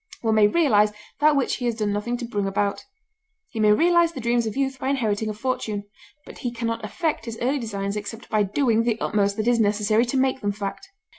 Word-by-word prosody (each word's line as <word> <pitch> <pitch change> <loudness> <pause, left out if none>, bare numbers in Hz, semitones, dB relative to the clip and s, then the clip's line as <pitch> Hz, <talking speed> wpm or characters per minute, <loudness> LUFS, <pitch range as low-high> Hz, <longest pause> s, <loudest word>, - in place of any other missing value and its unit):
One 225 -2 +1
may 215 -1 +5
realize 210 -7 +3 0.3
that 300 0 +4
which 275 -3 0
he 245 - -4
has 235 -2 0
done 210 -2 -1
nothing 235 +4 -2
to 240 - -5
bring 205 -4 -2
about; 200 +1 -1 0.6
he 225 - -6
may 210 -1 +5
realize 340 +7 +4
the 270 - -6
dreams 235 -1 +1
of 220 - -5
youth 270 -1 -1
by 265 - -2
inheriting 220 -5 0
a - - -2
fortune; 215 -3 -2 0.4
but - - -12
he 245 - -3
can 235 -1 -3
not 230 0 -3
effect 305 - -2
his 230 -1 -6
early 270 +4 0
designs 200 -4 -3
except 210 +3 -6
by 215 -1 +1
doing 225 +3 +2
the 230 -1 0
utmost 200 -1 0
that 215 +1 -1
is 240 -1 +3
necessary 215 +2 +2
to 250 +3 -2
make 260 0 +1
them 205 0 -1
fact. 205 - -6
225 Hz, 230 wpm, -24 LUFS, 210-255 Hz, 0.6 s, may